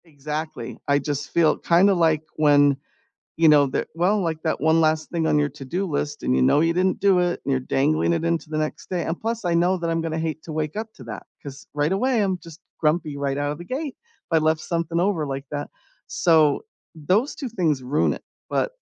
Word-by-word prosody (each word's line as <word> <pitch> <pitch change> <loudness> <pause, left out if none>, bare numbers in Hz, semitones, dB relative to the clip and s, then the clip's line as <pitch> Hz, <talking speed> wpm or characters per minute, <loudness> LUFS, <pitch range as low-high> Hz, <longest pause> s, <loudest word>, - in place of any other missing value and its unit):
Exactly, 155 0 -6
I 140 - +4
just 145 0 -3
feel 165 -2 +3
kinda 185 +4 +4
like 160 -3 +2
when, 145 -2 +5 0.6
you 165 0 +4
know, 145 -2 +6
the 130 - -2
well, 180 +6 +2
like 165 -4 -2
that 160 - 0
1 160 +1 +3
last 155 0 +1
thing 165 -2 0
on 150 - +3
your 145 0 +2
to-do 145 +7 -4
list 145 -3 -3
and 65 +1 +2
you 65 - +2
know 65 - +4
you 165 +1 +2
didn't 185 +3 +1
do 195 -2 +4
it 175 -1 0
and 140 - 0
you're 130 - +2
dangling 150 +6 +1
it 165 0 -1
into 170 -1 -1
the 155 - -3
next 155 0 -3
day 180 -2 -1
and 165 - -3
plus, 225 -2 -3
I 175 - +1
know 175 +2 +3
that 170 -1 -3
I'm 165 0 0
gonna 160 -1 -3
hate 160 -1 -3
to 160 - -8
wake 155 +1 -3
up 220 +1 -4
to 130 - -12
that, 110 -1 -8 0.2
'cause, 140 0 -10
right 150 +2 +1
away, 230 +3 +2
I'm 190 -2 -1
just 165 -1 -13 0.2
grumpy 155 -1 0
right 140 -1 -1
out 145 0 -1
of 150 - -6
the - - -7
gate 275 - -4
if 470 0 -38
I 165 - +4
left 155 0 +1
something 170 -1 -2
over 175 -5 0
like 135 0 -4
that. 145 -1 -4 0.4
So, 160 - +3 0.3
those 185 - 0
2 265 - -5
things 160 - 0
ruin 135 +4 +1
it, - - -10 0.3
but, - - 0
160 Hz, 230 wpm, -23 LUFS, 145-175 Hz, 0.6 s, know